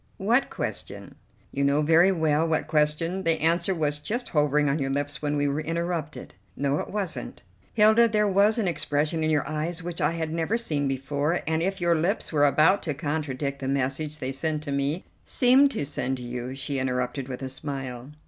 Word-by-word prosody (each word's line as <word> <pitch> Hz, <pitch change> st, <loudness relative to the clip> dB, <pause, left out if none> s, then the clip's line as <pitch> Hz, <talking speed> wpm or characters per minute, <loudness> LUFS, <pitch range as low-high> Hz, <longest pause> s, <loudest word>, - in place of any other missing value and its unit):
"What -, -, +2 dB
question?" -, -, -5 dB, 0.4 s
"You 140 Hz, -, -1 dB
know 140 Hz, +2 st, +2 dB
very 165 Hz, +5 st, +5 dB
well 160 Hz, -2 st, +1 dB
what 160 Hz, -1 st, 0 dB
question; 155 Hz, +4 st, +1 dB
the 165 Hz, -3 st, +2 dB
answer 170 Hz, +4 st, +2 dB
was 150 Hz, -2 st, 0 dB
just 235 Hz, +12 st, -3 dB
hovering 150 Hz, -1 st, +2 dB
on 140 Hz, +3 st, 0 dB
your 135 Hz, -1 st, -1 dB
lips 145 Hz, +1 st, -2 dB
when 150 Hz, 0 st, -1 dB
we 145 Hz, 0 st, +1 dB
were 140 Hz, +2 st, -1 dB
interrupted." 165 Hz, -4 st, -4 dB, 0.2 s
"No, 140 Hz, +1 st, 0 dB
it -, -, -5 dB
wasn't." 185 Hz, -12 st, -5 dB, 0.3 s
"Hilda, 220 Hz, +2 st, +6 dB
there 210 Hz, -1 st, +1 dB
was 200 Hz, +3 st, +3 dB
an 215 Hz, -5 st, 0 dB
expression 155 Hz, -1 st, 0 dB
in 155 Hz, -, +1 dB
your 150 Hz, -2 st, +1 dB
eyes 160 Hz, +3 st, -2 dB
which 175 Hz, -1 st, -4 dB
I -, -, +2 dB
had 160 Hz, -1 st, -3 dB
never 165 Hz, +7 st, 0 dB
seen 150 Hz, -11 st, -1 dB
before, 140 Hz, +5 st, -1 dB
and 160 Hz, 0 st, 0 dB
if 195 Hz, +3 st, -1 dB
your 175 Hz, -1 st, +2 dB
lips 170 Hz, +3 st, 0 dB
were 145 Hz, -1 st, +4 dB
about 160 Hz, +7 st, +4 dB
to 150 Hz, -4 st, -3 dB
contradict 145 Hz, -2 st, -3 dB
the 135 Hz, -, -4 dB
message 140 Hz, +3 st, -1 dB
they 130 Hz, -2 st, -3 dB
sent 150 Hz, +2 st, -2 dB
to 145 Hz, -, -5 dB
me 140 Hz, +5 st, -1 dB
" -, -, -37 dB
"Seemed 260 Hz, +3 st, +4 dB
to -, -, -2 dB
send 135 Hz, -2 st, -2 dB
to 125 Hz, -, -8 dB
you," 125 Hz, +1 st, -5 dB
she 135 Hz, 0 st, -2 dB
interrupted 125 Hz, 0 st, -2 dB
with 130 Hz, 0 st, -6 dB
a -, -, -3 dB
smile. 135 Hz, -2 st, -6 dB
150 Hz, 205 wpm, -26 LUFS, 140-170 Hz, 0.4 s, Hilda